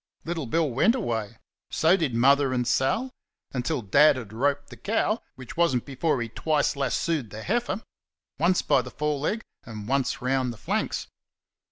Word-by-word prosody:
Little 165 -5 -3
Bill 165 +6 +1
went 140 - +3
away; 115 - -3 0.3
so 165 +3 +4
did 155 -10 -1
Mother 135 +2 +4
and 125 -1 0
Sal 135 - +1 0.4
until 130 +1 -2
Dad 145 +8 +5
had 115 -5 -7
roped 140 +4 0
the - - -8
cow, 215 +1 0
which 130 -2 -10
was 170 -5 +3
n't 120 - -1
before 140 +1 0
he - - -5
twice 150 +4 0
lassoed 140 -1 -1
the 110 +1 -8
heifer 225 0 -1 0.6
once 175 +3 +3
by 135 - +3
the 125 - -8
fore 150 +3 -1
leg 215 +10 -1 0.2
and 105 -2 -8
once 140 +3 0
round 130 -1 0
the 115 - -10
flanks. 90 - -2
140 Hz, 175 wpm, -26 LUFS, 125-165 Hz, 0.6 s, Dad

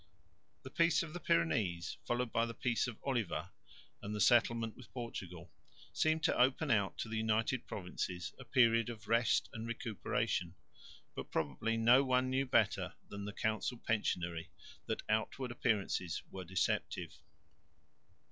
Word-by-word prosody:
The 130 - -9
peace 170 +1 +3
of 155 -2 -8
the 175 - -4
Pyrenees, 85 - +1
followed 120 -1 -1
by 115 +1 +2
the 115 - -6
peace 125 0 0
of 120 -3 -6
Oliva 100 - -1 0.5
and 105 +1 -4
the - - -3
settlement 115 0 +3
with 125 - -14
Portugal, 90 -8 -6 0.4
seemed 155 0 +2
to - - +3
open 130 +1 +3
out 100 -4 +2
to - - -3
the 110 0 -3
United 110 +3 0
Provinces 90 -3 -4
a - - -8
period 115 -3 +4
of 110 -3 -8
rest 115 +1 +3
and 110 0 -5
recuperation, 115 -5 -2 0.6
but - - -6
probably 80 - -1
no 120 +4 +6
one 130 -1 +2
knew 135 +1 +1
better - - +2
than 100 0 -6
the 105 - -4
council 110 +4 -1
pensionary 90 -7 -1 0.4
that - - -2
outward 110 +4 -1
appearances 100 -8 0
were 95 -1 -6
deceptive. 95 +2 -1
115 Hz, 145 wpm, -35 LUFS, 95-125 Hz, 0.6 s, no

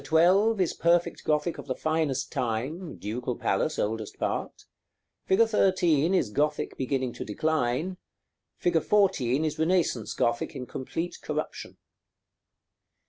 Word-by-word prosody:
12 185 +9 +4
is 185 - +1
perfect 170 0 +1
Gothic 150 +2 0
of - - -9
the 130 - -2
finest 155 -4 -1
time 130 +10 -3
(Ducal 120 +4 -4
Palace, - - 0
oldest 110 0 -2
part), - - -3 0.6
fig. 190 - +3
13 185 -6 +3
is 110 - +1
Gothic 150 +4 0
beginning 130 -2 -1
to - - -6
decline, 155 - -1 0.6
fig. 170 -2 +2
14 160 - +2
is 155 0 -3
Renaissance 160 - +1
Gothic 120 +4 0
in 130 -2 -5
complete 165 +8 -5
corruption. - - -5
155 Hz, 125 wpm, -27 LUFS, 125-175 Hz, 0.6 s, 12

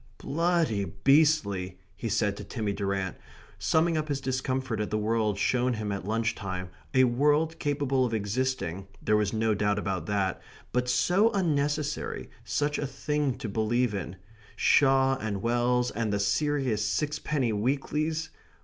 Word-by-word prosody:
"Bloody 165 - +1
beastly," 105 - +2 0.2
he 115 +3 -4
said 105 -1 +1
to - - -6
Timmy 105 -4 -3
Durrant, 95 -2 -2 0.4
summing 160 +1 +2
up 155 - -3
his 140 -2 -1
discomfort 130 -3 -2
at 105 - -2
the 105 - 0
world 110 -1 0
shown 125 +3 +1
him 110 -2 -3
at 100 -1 -4
lunch 115 +1 0
time, 95 -3 -5 0.2
a 130 - +6
world 150 +6 +2
capable 140 -2 +1
of 125 - 0
existing 105 -4 -2
there 105 - +1
was 105 -1 +1
no 110 0 +1
doubt 105 0 +1
about 95 -5 -2
that 100 -3 0 0.3
but 125 0 0
so 185 - +3
unnecessary, 150 -5 -1
such 145 0 -1
a 145 - -1
thing 150 -1 -1
to - - -5
believe 110 +3 +1
in 95 -2 -4 0.4
Shaw 135 -1 +4
and 100 -3 -4
Wells 120 +1 +1
and 110 0 -2
the 100 - 0
serious 125 +1 +1
sixpenny 145 0 -1
weeklies! 150 +8 -1
120 Hz, 150 wpm, -28 LUFS, 105-145 Hz, 0.4 s, a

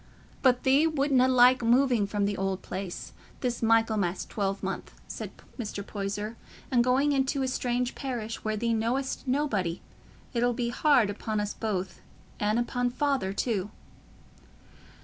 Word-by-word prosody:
"But 250 -2 +3
thee 275 +4 +4
wutna 275 -4 +3
like 255 0 +6
moving 240 -2 +3
from 205 0 0
th' 205 0 0
old 195 -1 -2
place, 185 -1 -6 0.3
this 245 -2 -1
Michaelmas 220 -5 +2
twelvemonth," 195 -2 -3
said - - -6 0.3
Mr. 205 -3 -4
Poyser, 205 +2 -4 0.3
"and 245 -2 +4
going 265 +4 +3
into 270 0 +1
a - - 0
strange 250 -1 -1
parish, 235 -5 -4
where 215 0 -1
thee 230 +2 0
know'st 250 +5 -1
nobody. 220 - 0 0.5
It'll 245 0 +2
be 235 0 -1
hard 245 -4 +3
upon 215 +1 -3
us 210 0 -2
both, 195 -4 -3 0.4
and 210 +2 +1
upo' 245 +1 0
Father 270 -6 0
too." 205 -1 -1
235 Hz, 140 wpm, -28 LUFS, 205-255 Hz, 0.5 s, like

